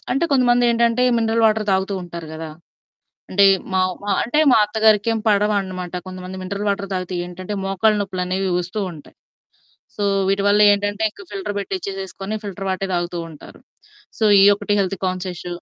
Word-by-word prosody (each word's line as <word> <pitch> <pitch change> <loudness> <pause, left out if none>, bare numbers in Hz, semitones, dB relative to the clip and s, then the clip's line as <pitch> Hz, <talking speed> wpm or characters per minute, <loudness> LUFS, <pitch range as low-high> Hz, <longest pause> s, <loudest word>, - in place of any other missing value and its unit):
అంటే 275 +6 +1
కొంతమంది 245 -2 +3
ఏంటంటే 235 +1 +2 0.2
మినరల్ 225 0 +1
వాటర్ 215 -1 +1
తాగుతూ 190 +1 0
ఉంటారు 170 -2 -8
గదా! 160 0 -7 0.8
అంటే 200 +1 +4 0.3
మా 185 - +3 0.2
మా 205 - -2
అంటే 245 +7 -1
మా - - +6
అత్తగారికి 215 0 +2
ఏం 225 - -1
పడవు 210 0 +2
అన్నమాట. 185 -2 -6
కొంతమంది 185 0 -8
మినరల్ 200 +3 -4
వాటర్ 200 0 -3
తాగితే 185 0 -4
ఏంటంటే 185 +3 -7
మోకాళ్ళ 195 +3 +2
నొప్పులు 190 -2 -3
అనేవి 190 +1 -1
వస్తూ 180 +4 -5
ఉంటాయి. 150 -3 -14 0.8
సో 205 - -3 0.2
వీటివల్లేంటంటే 205 +1 +3
ఇంకా 205 - -14
ఫిల్టర్ 200 +1 -4
పెట్టిచేసుకొని 195 +1 -5
ఫిల్టర్ 195 -1 -6
వాటర్ 190 +1 -2
తాగుతూ 175 0 -2
ఉంటారు. 155 -3 -14 0.6
సో - - -2 0.2
ఈ - - +7
ఒక్కటి 205 0 -2
హెల్త్ 195 0 0
కాన్షియస్. 185 -1 -4
195 Hz, 160 wpm, -20 LUFS, 185-210 Hz, 0.8 s, ఈ